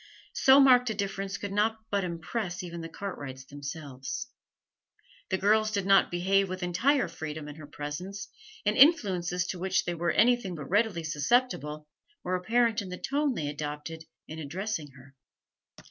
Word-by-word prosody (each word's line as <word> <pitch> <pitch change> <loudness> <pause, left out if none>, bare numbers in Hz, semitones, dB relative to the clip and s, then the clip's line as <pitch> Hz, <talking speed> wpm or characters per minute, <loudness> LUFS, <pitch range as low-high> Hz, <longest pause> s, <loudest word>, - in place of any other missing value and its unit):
So 270 +1 +6
marked 250 -3 +6
a 220 - -2
difference 195 -1 -3
could 200 0 -5
not 215 +2 +1
but 200 -1 +1
impress 180 +2 -4
even 170 -1 -6
the 165 - -6
Cartwrights 140 -11 -7
themselves; 145 - -6 1.0
the 190 - +1
girls 215 +3 +3
did 200 -3 -1
not 195 0 +5
behave 190 +2 +2
with 185 0 -4
entire 235 +8 +2
freedom 155 -2 -6
in 150 +1 -9
her 155 -2 -10
presence, 180 +8 -6 0.4
and 210 +1 +2
influences 185 - +4
to 180 - -4
which 190 +1 +1
they 175 - -1
were 170 0 -1
anything 230 -3 +3
but 150 -3 -7
readily 205 -4 +2
susceptible 150 - 0 0.4
were 185 - -1
apparent 225 +4 +2
in 195 - -7
the 180 - -5
tone 280 +2 0
they 150 - -2
adopted 150 +2 -5 0.2
in 160 +1 -7
addressing 165 +2 -4
her. 135 0 -16
185 Hz, 160 wpm, -29 LUFS, 160-215 Hz, 1.0 s, So